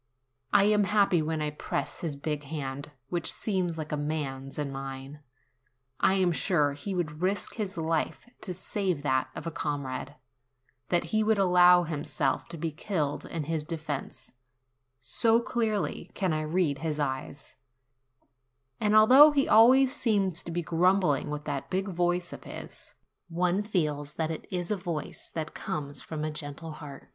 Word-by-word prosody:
I 205 -1 +6
am 210 0 +4
happy 200 -4 +3
when 155 0 -1
I 150 - -1
press 150 - -4
his 160 -4 -3
big 150 +1 -3
hand, 140 -1 -5 0.2
which 170 -2 0
seems 185 -5 -2
like 155 -1 -5
a - - +1
man's, 145 -3 -3
in 145 -2 -2
mine. 135 +1 -7 0.8
I 190 - +4
am 185 -2 +3
sure 150 -4 +1
he 185 +7 -5
would 155 -3 -3
risk 190 +1 -1
his 200 -5 -4
life 160 +6 -1
to 190 - -4
save 185 -3 -2
that 130 -3 +1
of - - -6
a 165 - -3
comrade; 145 -2 -4 0.7
that 175 -1 +2
he 215 0 +3
would 220 0 +3
allow 180 -2 +6
himself 150 -3 -1
to 170 - -7
be 165 0 -2
killed 150 -3 -2
in 165 -2 -4
his 160 0 -2
defence, 150 -5 -4 0.7
so 225 - +3
clearly 225 -3 -1
can 185 -5 0
I 155 - 0
read 155 -2 0
his 155 -1 -2
eyes; 140 0 -4 1.2
and 210 0 +2
although 255 +8 +9
he 285 -2 +2
always 255 +4 +6
seems 195 -7 +1
to 170 - -6
be 175 +1 -2
grumbling 170 -3 +2
with 150 0 -4
28 145 - -2
NOVEMBER - - -4
that - - -24
big 190 +2 -1
voice 175 0 0
of - - -10
his, - - -9 0.3
one 180 +3 +1
feels 150 -8 -1
that 160 0 -1
it 160 - -6
is 180 +1 -2
a 210 - +1
voice 170 -4 -5
that 155 -2 -3
comes 145 -1 -4
from 155 -2 -5
a 155 - -1
gentle 150 +2 -5
heart. 150 -3 -10
165 Hz, 170 wpm, -28 LUFS, 150-190 Hz, 1.2 s, although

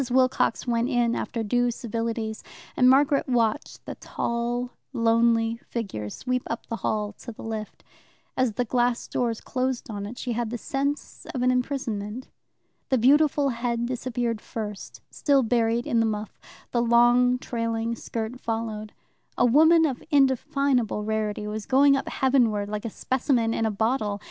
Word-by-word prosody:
Wilcox 255 -2 +2
went 235 0 0
in 240 -3 +2
after 230 -1 -3
due 245 +3 +1
civilities, 230 -1 -3 0.3
and 250 0 +5
Margaret 275 +1 +3
watched 235 +2 0
the - - -5
tall, 240 +1 -3 0.2
lonely 230 -1 +2
figure 195 - -4
sweep 250 - -2
up 230 - -4
the 230 - -4
hall 210 -2 -2
to 240 - -8
the 220 - -11
lift. 220 -1 -6 0.5
As 255 -4 +1
the 245 +3 -1
glass 245 0 0
doors 235 -3 -1
closed 255 -2 -2
on 200 -1 -5
it 240 +4 -9
she 250 - -3
had 235 -1 -1
the 240 - -3
sense 280 +5 -3
of 250 - -1
an 255 - +4
imprisonment. 250 -3 -3 0.6
The 260 - +3
beautiful 285 +3 +4
head 235 -1 -1
disappeared 240 -2 -2
first, 210 -3 -7
still 280 -3 +2
buried 230 0 +1
in 235 - +1
the 225 - +3
muff, 210 -1 -4 0.3
the 240 - +1
long 240 +1 +4
trailing 230 -2 -2
skirt 230 +2 -5
followed. 225 -2 -4 0.4
A - - +4
woman 320 +6 +6
of 265 -5 -2
undefinable 270 -5 +2
rarity 215 -1 -2
was 210 0 -5
going 275 +1 +5
up 275 - -2
heaven 260 -3 +3
ward, 205 -1 -3
like 210 +1 -4
a - - -2
specimen 240 -1 0
in 225 - 0
a - - 0
bottle. 215 -1 0
235 Hz, 160 wpm, -25 LUFS, 225-255 Hz, 0.6 s, woman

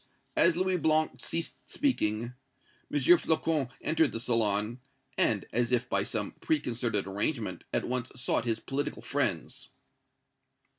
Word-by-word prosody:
As 170 +1 +4
Louis 185 0 +1
Blanc 155 -1 +1
ceased 165 0 -2
speaking, 120 - 0 0.6
M. 145 - +1 0.2
Flocon 155 -4 +1
entered 160 -4 +2
the 115 - -2
salon, 115 -1 0 0.4
and, - - +2
as 120 +1 +1
if 125 0 +2
by - - +1
some - - -2
preconcerted 120 -8 0
arrangement, 105 +5 -2
at - - 0
once 125 0 -1
sought 125 - 0
his 115 -2 0
political 140 +4 -3
friends. - - -2
125 Hz, 130 wpm, -30 LUFS, 115-155 Hz, 0.6 s, As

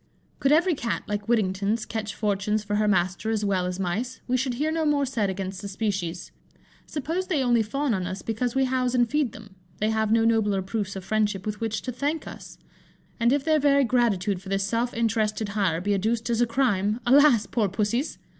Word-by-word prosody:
Could 275 - +2
every 340 +4 +4
Cat, 230 - -2
like 205 -1 -4
Whittington's, 205 0 +1
catch 215 -2 -4
fortunes 210 0 0
for 205 0 -1
her 210 0 +2
master 185 +2 +1
as 215 -2 0
well 185 -2 +1
as 180 +1 -4
mice, 210 +8 -2
we 255 - +1
should 255 -1 0
hear 300 +5 0
no 320 0 0
more 295 -2 +2
said 230 -7 -1
against 190 0 -4
the 200 - -5
species. 190 -4 -3 0.6
Suppose 330 +6 -3
they 300 -7 +1
only 240 -2 +3
fawn 270 +4 -1
on 185 -3 -2
us 185 +1 -5
because 230 +2 -2
we 270 0 +3
house 255 -1 0
and 240 -1 +3
feed 290 -1 0
them, 210 -2 -13 0.2
they 215 +1 0
have 220 -1 0
no 225 0 +4
nobler 210 -4 +2
proofs 200 0 -3
of 190 -1 -7
friendship 210 -2 0
with 210 +1 -4
which 225 -1 -2
to 255 - -3
thank 290 +6 -2
us; - - -10 0.6
and 235 +1 +3
if 280 0 +1
their 310 0 +3
very 280 -1 +4
gratitude 210 -7 +1
for 195 - -10
this 195 0 0
self 230 +4 0
interested 220 -2 0
hire 195 -6 0
be 205 +3 0
adduced 225 +4 0
as 235 0 +1
a 240 - +3
crime, 225 -4 +1
alas! 255 -3 +5
poor 215 -5 0
Pussies! 215 - -1
220 Hz, 210 wpm, -25 LUFS, 200-250 Hz, 0.6 s, alas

